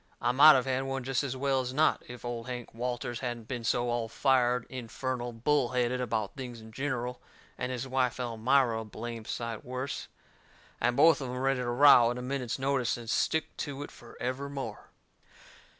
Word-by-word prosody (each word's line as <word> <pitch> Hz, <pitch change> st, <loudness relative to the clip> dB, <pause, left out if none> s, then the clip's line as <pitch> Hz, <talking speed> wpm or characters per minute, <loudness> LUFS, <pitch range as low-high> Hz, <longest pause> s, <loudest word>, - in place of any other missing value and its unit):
I 120 Hz, -, +2 dB
might 145 Hz, +4 st, +9 dB
of 130 Hz, -1 st, +2 dB
had 135 Hz, 0 st, 0 dB
one 135 Hz, -1 st, -3 dB
jest 135 Hz, +1 st, 0 dB
as 130 Hz, -2 st, -3 dB
well 135 Hz, 0 st, +1 dB
as 130 Hz, 0 st, -5 dB
not 155 Hz, +2 st, +3 dB
if 125 Hz, 0 st, -9 dB
Old 120 Hz, 0 st, -4 dB
Hank 125 Hz, -2 st, -6 dB
Walters 120 Hz, 0 st, -3 dB
hadn't 120 Hz, -3 st, -4 dB
been 120 Hz, -2 st, -4 dB
so 120 Hz, +2 st, +1 dB
all 120 Hz, -1 st, -1 dB
fired, 125 Hz, -1 st, +2 dB
infernal 125 Hz, 0 st, -4 dB
bull 125 Hz, +2 st, +1 dB
headed 125 Hz, 0 st, +1 dB
about 110 Hz, -4 st, -2 dB
things 125 Hz, -3 st, -7 dB
in 110 Hz, 0 st, -12 dB
gineral, 125 Hz, -1 st, -3 dB, 0.3 s
and 125 Hz, +1 st, -3 dB
his 130 Hz, +1 st, -4 dB
wife 130 Hz, -2 st, 0 dB
Elmira 120 Hz, 0 st, +2 dB
a -, -, -5 dB
blame 115 Hz, +1 st, -7 dB
sight 115 Hz, -1 st, -4 dB
worse, 130 Hz, +2 st, -4 dB, 0.7 s
and 120 Hz, +2 st, +1 dB
both 160 Hz, +1 st, +6 dB
of 130 Hz, -, -4 dB
em 125 Hz, -, -4 dB
ready 135 Hz, 0 st, +1 dB
to 125 Hz, -1 st, -2 dB
row 120 Hz, -2 st, +7 dB
at 120 Hz, -, -3 dB
a -, -, -4 dB
minute's 125 Hz, -2 st, -2 dB
notice 135 Hz, -3 st, 0 dB
and 115 Hz, -1 st, -5 dB
stick 160 Hz, 0 st, 0 dB
to 145 Hz, -1 st, -4 dB
it -, -, -9 dB
forevermore. 135 Hz, +3 st, -6 dB
125 Hz, 190 wpm, -30 LUFS, 120-135 Hz, 0.7 s, might